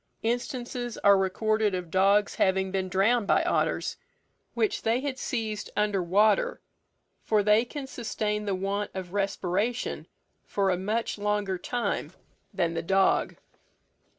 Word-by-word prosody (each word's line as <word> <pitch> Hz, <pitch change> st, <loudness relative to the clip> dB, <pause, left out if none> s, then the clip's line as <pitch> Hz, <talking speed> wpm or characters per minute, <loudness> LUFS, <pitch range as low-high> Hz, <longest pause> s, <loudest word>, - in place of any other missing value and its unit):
Instances 240 Hz, 0 st, -3 dB
are 200 Hz, 0 st, +7 dB
recorded 210 Hz, +2 st, +1 dB
of 175 Hz, -3 st, -5 dB
dogs 200 Hz, +2 st, +3 dB
having 190 Hz, 0 st, +1 dB
been 190 Hz, -1 st, -1 dB
drowned 205 Hz, +4 st, +2 dB
by -, -, +3 dB
otters, -, -, 0 dB, 0.6 s
which 430 Hz, -, 0 dB
they 225 Hz, +2 st, +1 dB
had 275 Hz, -2 st, -3 dB
seized 220 Hz, -4 st, -3 dB
under 210 Hz, -2 st, +1 dB
water, 215 Hz, -, +2 dB, 0.6 s
for 215 Hz, -2 st, +2 dB
they 210 Hz, +2 st, +4 dB
can 280 Hz, +2 st, -6 dB
sustain 215 Hz, -4 st, -3 dB
the 200 Hz, -2 st, 0 dB
want 200 Hz, +2 st, -2 dB
of 185 Hz, -1 st, -6 dB
respiration 200 Hz, +3 st, -1 dB, 0.4 s
for 195 Hz, -2 st, 0 dB
a -, -, +2 dB
much 215 Hz, +4 st, -2 dB
longer 205 Hz, -2 st, -1 dB
time 240 Hz, +5 st, -2 dB, 0.4 s
than 170 Hz, -3 st, 0 dB
the 165 Hz, -, -2 dB
dog. 195 Hz, +3 st, +2 dB
205 Hz, 135 wpm, -27 LUFS, 190-225 Hz, 0.6 s, are